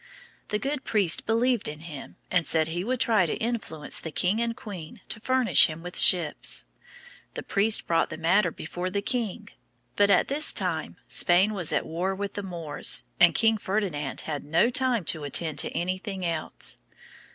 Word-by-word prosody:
The 210 - -1
good 275 +4 -4
priest 195 -6 +3
believed 235 +1 +1
in 150 +1 -7
him 155 -4 -10 0.2
and 180 -3 +1
said 160 -1 +2
he 175 +2 -3
would 250 +4 -2
try 215 -8 +2
to - - -2
influence 220 -10 -2
the 160 - -6
king 185 +8 0
and 235 0 -3
queen 190 0 -10
to - - -4
furnish 255 -4 +5
him 160 +1 -9
with 180 0 -8
ships. 170 -5 +3 0.7
The - - -5
priest 210 +2 +3
brought 165 - 0
the 155 - -7
matter 180 +4 +2
before 175 +3 -6
the 200 +2 -3
king; 220 -3 -3 0.5
but 205 0 +3
at 195 - +3
this 295 +2 +3
time - - -3
Spain 185 +4 +3
was 180 -6 +1
at - - -1
war 180 +4 -3
with 200 +1 -5
the 205 - -5
Moors, 170 -6 -1 0.2
and 175 -1 +5
King 225 -1 +3
Ferdinand 190 -9 -3
had 150 -3 -5
no 165 +10 +2
time 250 - +1
to 155 -1 0
attend 145 +1 -1
to - - 0
anything 185 +2 -4
else. 165 -2 -2
185 Hz, 180 wpm, -26 LUFS, 165-220 Hz, 0.7 s, furnish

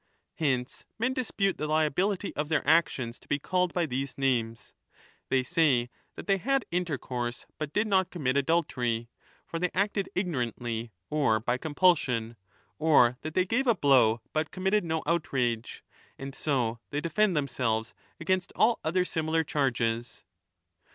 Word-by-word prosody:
Hence 130 -5 -1
men 250 +4 0
dispute 210 -6 -1
the 150 - -1
liability 170 +6 0
of 150 0 -2
their 155 -3 0
actions 135 -7 +2
to - - -23
be 145 - +1
called 180 +4 0
by 175 -2 0
these 135 -1 -4
names; 115 -5 -1 0.6
they 130 -1 +2
say 135 -7 +2 0.2
that - - -8
they 195 -1 +2
had 270 +4 +1
intercourse 130 -8 -3
but 155 -2 -3
did 210 +6 +1
not 190 -3 +2
commit 140 -8 -1
25 140 - +3
adultery 125 -7 0 0.4
(for 165 - -5
they 180 +1 +1
acted 200 0 0
ignorantly 120 - -2 0.2
or 140 -8 +2
by 120 +3 -1
compulsion), 145 -8 +2 0.4
or 125 -6 +4
that 155 +1 -6
they 185 - +3
gave 250 +7 0
a 235 - +5
blow 125 - +4
but 155 0 0
committed 190 +2 +1
no 160 -1 -2
outrage; 130 -8 -1 0.3
and 135 0 -7
so 125 -6 -1
they 145 - -2
defend 170 +3 +1
themselves 120 -5 -1 0.3
against 185 +3 0
all 230 +2 +3
other 180 +3 +1
similar 160 -1 0
charges. 120 -6 -1
150 Hz, 150 wpm, -28 LUFS, 125-180 Hz, 0.6 s, a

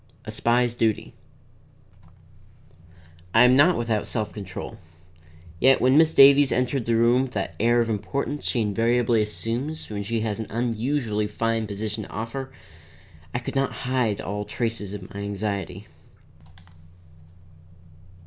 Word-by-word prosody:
A - - -6
SPY'S 120 0 +1
DUTY 115 -3 -1 2.2
I 115 - +8
am 125 +1 +6
not 165 +6 +5
without 115 -3 -1
self 110 -3 -3
control, 100 -3 -8 0.8
yet 135 +5 +5
when 130 +2 +3
Miss 160 +1 +4
Davies 140 0 +7
entered 125 0 0
the 115 - +1
room 120 +2 +4
with 130 -1 -4
that 95 -5 -3
air 120 +2 +3
of 115 - 0
importance 140 +7 -3
she 120 - 0
invariably 115 +2 +2
assumes 120 +8 -4
when 100 -1 -3
she 110 +3 -2
has 110 -1 -2
an 110 - -4
unusually 115 -1 -1
fine 115 +1 -1
position 105 +1 -5
to - - -14
offer, 125 +5 -5 0.8
I - - -2
could 125 - -6
not 135 -1 0
hide 125 -5 0
all 105 +1 -4
traces 105 -1 -3
of 95 -3 -10
my 100 - -6
anxiety. 100 -1 -4
115 Hz, 140 wpm, -24 LUFS, 105-125 Hz, 2.2 s, I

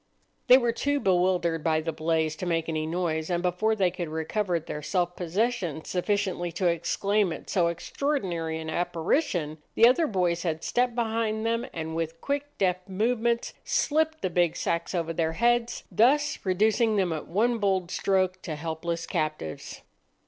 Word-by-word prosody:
They 250 - +9
were 240 -3 +1
too 285 +5 0
bewildered 180 - +1
by 160 -1 +2
the 160 +1 -2
blaze 160 0 0
to 180 - -4
make 165 -1 0
any 155 -1 -2
noise, 160 -1 -1
and 175 0 0
before 185 +5 +1
they 190 -4 +2
could 175 -2 -5
recover 170 +3 -1
their 150 -1 -6
self 175 +2 -1
possession 180 -3 -1
sufficiently 185 -2 -1
to 180 +2 -2
exclaim 180 +4 +1
at - - -7
so 180 -4 +3
extraordinary 170 - -2
an 160 0 -6
apparition, 170 - -1 0.2
the 230 - +7
other 310 +6 +3
boys 180 -5 0
had 160 -2 -2
stepped 245 -1 +1
behind 225 -2 -1
them, 230 +2 0
and 160 -1 -5
with 165 0 -3
quick, 285 - -3
deft 185 0 0
movements 235 +4 0
slipped 315 +1 +1
the 185 - 0
big 175 -1 +2
sacks 170 +3 -2
over 165 -1 -1
their 160 -1 0
heads, 240 +5 +1
thus 290 +6 +3
reducing 215 +4 +2
them 185 -4 +1
at 155 - -5
one 230 +6 +1
bold 190 -3 0
stroke 185 -1 +1
to 160 - -5
helpless 165 +2 -3
captives. 155 - -4
180 Hz, 165 wpm, -27 LUFS, 165-220 Hz, 0.2 s, They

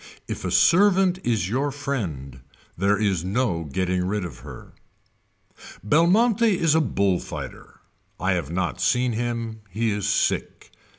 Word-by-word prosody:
If - - -5
a - - -2
servant 185 0 +4
is 110 -7 0
your 135 +7 -1
friend 90 - -4 0.4
there 100 +3 +2
is 100 -5 0
no 95 -4 -1
getting 90 +5 -1
rid 95 +1 -2
of 75 -8 -9
her. - - -12 1.1
Belmonte 200 - +3
is 165 -3 +2
a 160 - +4
bull 100 - +1
fighter. - - -9 0.4
I - - 0
have 70 - -1
not 85 +1 -2
seen 125 0 +2
him. 115 -1 -3
He 110 +1 -1
is 105 0 -2
sick. 110 - -1
110 Hz, 140 wpm, -24 LUFS, 95-145 Hz, 1.1 s, servant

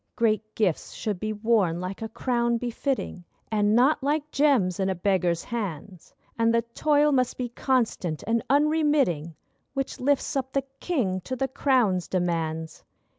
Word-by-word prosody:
Great 215 -2 0
gifts 195 -7 0
should 210 -4 -3
be 215 +2 -2
worn, 210 -6 +1
like 185 +3 -5
a 220 - -4
crown 235 0 0
befitting, 245 -4 -3 0.3
And 210 0 +2
not 265 +6 +4
like 295 +2 -1
gems 255 - +2
in 190 0 +1
a 190 - 0
beggar's 180 -2 +1
hands! 195 -5 -6 0.3
And 230 0 +4
the 230 0 +2
toil 300 -1 +3
must 255 -3 +1
be 245 -1 -3
constant 230 - -1
and 230 0 +1
unremitting 285 - +2 0.4
Which 270 -1 -3
lifts 280 +2 +1
up 265 -1 -2
the 275 - +1 0.2
king 210 - -1
to 255 +8 -4
the 270 +1 -1
crown's 240 -9 +1
demands. 165 -3 -2
230 Hz, 155 wpm, -26 LUFS, 185-265 Hz, 0.4 s, not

